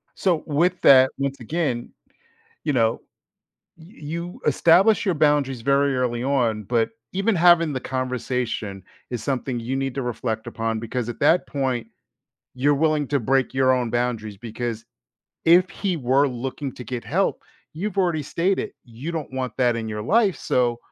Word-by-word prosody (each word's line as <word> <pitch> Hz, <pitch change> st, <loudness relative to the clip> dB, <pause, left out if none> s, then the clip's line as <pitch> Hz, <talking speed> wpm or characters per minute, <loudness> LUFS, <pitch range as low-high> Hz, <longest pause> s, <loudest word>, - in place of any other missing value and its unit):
so 175 Hz, -5 st, +1 dB
with 170 Hz, +4 st, +1 dB
that, 130 Hz, -1 st, +7 dB
once 140 Hz, 0 st, -2 dB
again, 125 Hz, -2 st, -2 dB, 0.8 s
you 150 Hz, -, +1 dB
know, 115 Hz, -3 st, +1 dB, 0.8 s
y 160 Hz, -, -15 dB, 0.2 s
you 170 Hz, +4 st, -6 dB
establish 180 Hz, +10 st, +4 dB
your 185 Hz, -4 st, +1 dB
boundaries 145 Hz, -4 st, +2 dB
very 140 Hz, +2 st, +2 dB
early 120 Hz, -2 st, -1 dB
on, 120 Hz, -6 st, +1 dB
but 115 Hz, +2 st, +1 dB, 0.2 s
even 195 Hz, +4 st, +1 dB
having 170 Hz, -2 st, +5 dB
the 130 Hz, -, -2 dB
conversation 125 Hz, -6 st, -3 dB, 0.3 s
is 120 Hz, -3 st, -4 dB
something 130 Hz, -2 st, -2 dB
you 120 Hz, +3 st, -3 dB
need 135 Hz, -1 st, -2 dB
to 135 Hz, -, -2 dB
reflect 115 Hz, -2 st, -3 dB
upon 115 Hz, -1 st, -2 dB
because 115 Hz, +1 st, -3 dB
at 120 Hz, -, -6 dB
that 180 Hz, -, +4 dB
point, 130 Hz, -5 st, -2 dB, 0.7 s
you're 145 Hz, +3 st, +2 dB
willing 155 Hz, -1 st, +1 dB
to 140 Hz, +1 st, +1 dB
break 135 Hz, +3 st, +1 dB
your 130 Hz, 0 st, +3 dB
own 125 Hz, -2 st, 0 dB
boundaries 115 Hz, -3 st, -2 dB
because 115 Hz, +1 st, -5 dB, 0.6 s
if 175 Hz, +2 st, +6 dB
he 185 Hz, 0 st, -2 dB
were 135 Hz, +1 st, +2 dB
looking 130 Hz, +2 st, -4 dB
to 125 Hz, -, -9 dB
get 125 Hz, -1 st, -5 dB
help, 170 Hz, +12 st, 0 dB, 0.3 s
you've 200 Hz, +6 st, -4 dB
already 175 Hz, -5 st, +1 dB
stated, 175 Hz, +6 st, -1 dB
you 125 Hz, +7 st, -7 dB
don't 160 Hz, -5 st, -5 dB
want 130 Hz, -1 st, -3 dB
that 125 Hz, -2 st, +2 dB
in 115 Hz, -1 st, -4 dB
your 105 Hz, 0 st, -4 dB
life, 205 Hz, -, +3 dB
so 120 Hz, -2 st, +1 dB
130 Hz, 165 wpm, -23 LUFS, 120-155 Hz, 0.8 s, that